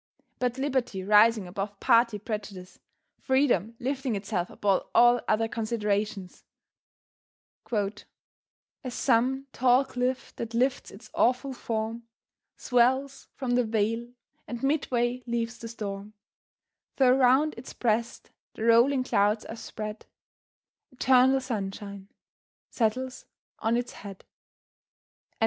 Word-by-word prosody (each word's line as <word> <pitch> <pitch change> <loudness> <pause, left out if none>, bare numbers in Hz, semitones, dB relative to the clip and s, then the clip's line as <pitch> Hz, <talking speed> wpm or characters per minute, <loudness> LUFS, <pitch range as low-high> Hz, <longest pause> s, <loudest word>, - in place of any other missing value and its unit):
But 250 0 -1
Liberty 260 -8 -1
rising 210 0 +5
above 195 +2 -5
party 230 -2 +4
prejudice, 205 -3 -7 0.4
Freedom 245 - +1
lifting 265 -2 -2
itself 195 -3 -2
above 200 -2 0
all 240 0 +6
other 225 +1 +2
considerations, 210 -4 -2 1.3
"As 205 -2 -2 0.9
some 260 +4 +1
tall 255 +2 +4
cliff 255 0 -3
that 230 0 -5
lifts 255 +3 0
its - - -14
awful 255 +2 +1
form, 230 -1 -4 0.5
Swells 260 +2 +1
from 260 -2 -3
the 245 0 +3
vale, 225 +1 -1 0.4
and 240 +2 -6
midway 250 -4 0
leaves 235 0 -2
the 230 - -7
storm, 205 -2 -6 0.8
Though 255 -2 +5
round 270 +4 +4
its 235 +3 -9
breast 235 0 -1 0.2
the - - -5
rolling 240 +4 +4
clouds 210 -3 +1
are 225 - -7
spread, 215 -1 -7 0.8
Eternal 260 +1 +4
sunshine 200 -4 -5 0.6
settles 255 +3 -2 0.3
on 225 +2 +1
its 245 0 -3
head." 200 -2 -11
235 Hz, 110 wpm, -27 LUFS, 210-255 Hz, 1.3 s, all